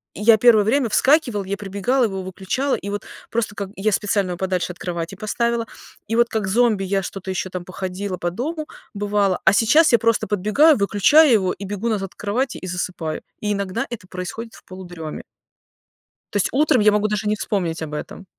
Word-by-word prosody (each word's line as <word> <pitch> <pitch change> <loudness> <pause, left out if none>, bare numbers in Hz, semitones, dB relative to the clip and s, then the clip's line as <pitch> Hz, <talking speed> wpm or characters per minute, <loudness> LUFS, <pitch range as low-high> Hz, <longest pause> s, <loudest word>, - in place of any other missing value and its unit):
я 220 +2 +5
первое 225 -2 +6
время 245 +4 +2
вскакивала, 255 -6 +3
я 200 +1 -2
прибегала, 205 +6 0
его 195 -3 -3
выключала, 195 +9 -2
и 200 - -6
вот 205 0 -4 0.3
просто 225 -2 -1
как 200 -2 -4
Я 210 +3 0
специально 200 -1 0
его 175 - -4
подальше 180 -2 -2
от - - -24
кровати 170 +1 -4
поставила, 235 +3 -1 0.5
и - - +1
вот, 235 0 +3
как 215 -3 -2
зомби, 220 -1 +2
я 195 +1 0
что-то 190 +1 -6
еще 185 0 -3
там 185 -1 -5
походила 185 +1 -5
по 175 - -2
дому, 305 - -4 0.3
бывало, 200 -2 +1
а 190 - +6
сейчас 240 +10 +5
я - - +8
просто 230 -1 +1
подбегаю, 215 - +4
выключаю 220 +9 +5
его 190 -4 +2
и 200 - -8
бегу 205 +4 -3
назад 195 -4 -2
к - - -47
кровати 235 +6 -1
и - - -4
засыпаю, 175 -3 -4 0.2
и 210 - -1
иногда 200 +2 -2
это 225 -6 -8
происходит 185 +6 -6
в - - -16
полудреме. 175 -4 -8 1.1
То - - +1
есть 200 - +1
утром 270 -3 +3
я 210 0 +5
могу 210 0 +2
даже 210 0 -2
не 210 - +2
вспомнить 180 -6 -2
об 155 -2 -5
этом. 170 +5 -7
205 Hz, 200 wpm, -21 LUFS, 185-230 Hz, 1.1 s, я